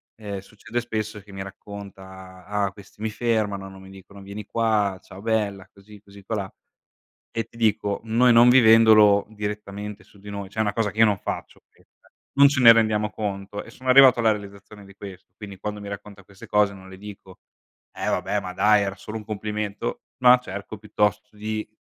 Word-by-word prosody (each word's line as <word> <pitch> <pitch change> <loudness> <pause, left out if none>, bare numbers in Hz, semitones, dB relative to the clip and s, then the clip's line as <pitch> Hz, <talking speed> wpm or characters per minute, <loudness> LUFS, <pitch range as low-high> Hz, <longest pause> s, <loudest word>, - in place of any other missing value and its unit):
ehm, 100 -3 -6
succede 110 +4 -6
spesso 110 -3 -4
che 100 0 -17
mi 95 - -6
racconta: 95 -2 -11
"Ah 100 -1 -1
questi 100 +1 -17
mi 110 - -1
fermano, 105 -4 -1
non 95 0 -13
mi 95 - -13
dicono 95 +1 -14
vieni 100 +1 -8
qua, 105 -4 0
ciao 95 - -12
bella 105 -4 -1
così 100 +1 -16
così 100 -1 -16
qua 110 +3 -3
là" 95 -2 -5 0.8
e 115 - -1
ti 115 - -24
dico 105 -3 0
noi 120 +2 +3
non 120 +1 +7
vivendolo 110 -4 +6
direttamente 105 -1 -6
su 100 - -22
di 105 +1 -11
noi, 100 -1 -6
cioè 110 - -8
è - - +4
una 100 -2 0
cosa 105 -3 -1
che - - -18
io 115 - +8
non 105 -3 +1
faccio - - -6
questa, - - -29 0.2
non 140 0 +7
ce 140 -2 -1
ne 115 -2 +10
rendiamo 110 -2 +1
conto 100 -1 -5
e - - -14
sono 130 0 -7
arrivato 130 -1 +7
alla 115 -2 +4
realizzazione 100 0 -8
di 100 - -15
questo, 95 -2 -12
quindi 100 -3 -9
quando 105 +1 -5
mi 100 - -8
racconta 100 0 -9
queste 100 +1 -15
cose 105 -1 +2
non 95 -1 -13
le 95 - -11
dico: 95 -2 -12 0.5
"Eh - - -5
vabbè 105 - 0
ma 90 -1 -7
dai 105 +2 +4
era 100 -1 -3
solo 110 +1 -7
un 110 - -10
complimento", 105 - -4 0.2
no 125 0 +7
cerco 100 -1 -8
piuttosto 105 0 -1
di 110 +1 -4
105 Hz, 200 wpm, -24 LUFS, 100-110 Hz, 0.8 s, ne